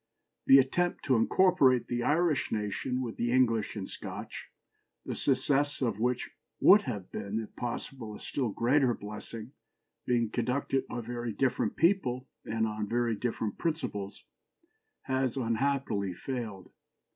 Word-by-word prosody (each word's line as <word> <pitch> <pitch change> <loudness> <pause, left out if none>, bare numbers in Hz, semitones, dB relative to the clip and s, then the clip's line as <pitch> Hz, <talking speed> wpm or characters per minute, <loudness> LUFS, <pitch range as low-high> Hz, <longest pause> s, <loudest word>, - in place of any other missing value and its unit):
The 135 - +9
attempt 175 +7 +1
to 130 - +3
incorporate 130 0 +4
the 120 0 -2
Irish 155 +1 +2
nation 110 +5 -2
with 115 -3 -5
the 120 0 0
English 115 -4 +2
and 100 -3 -4
Scotch, - - -7 0.6
the - - -3
success 140 +2 +1
of 115 -5 -1
which 125 +1 0 0.3
would 205 +2 +8
have 100 -6 -5
been, 100 +3 -3
if 110 - -8
possible, 120 -2 -5
a - - -10
still 130 -5 -2
greater 125 +3 +2
blessing, 105 +3 -8 0.6
being 120 -3 +1
conducted 130 +3 0
by 120 - -4
very 120 0 -4
different 125 -4 0
people 135 -8 +2 0.2
and 110 0 0
on 105 -1 -3
very 120 0 +1
different 110 -2 -3
principles, 105 - -3 0.8
has 130 -1 0
unhappily 115 -5 0
failed. 110 -6 -5
120 Hz, 135 wpm, -30 LUFS, 110-135 Hz, 0.8 s, The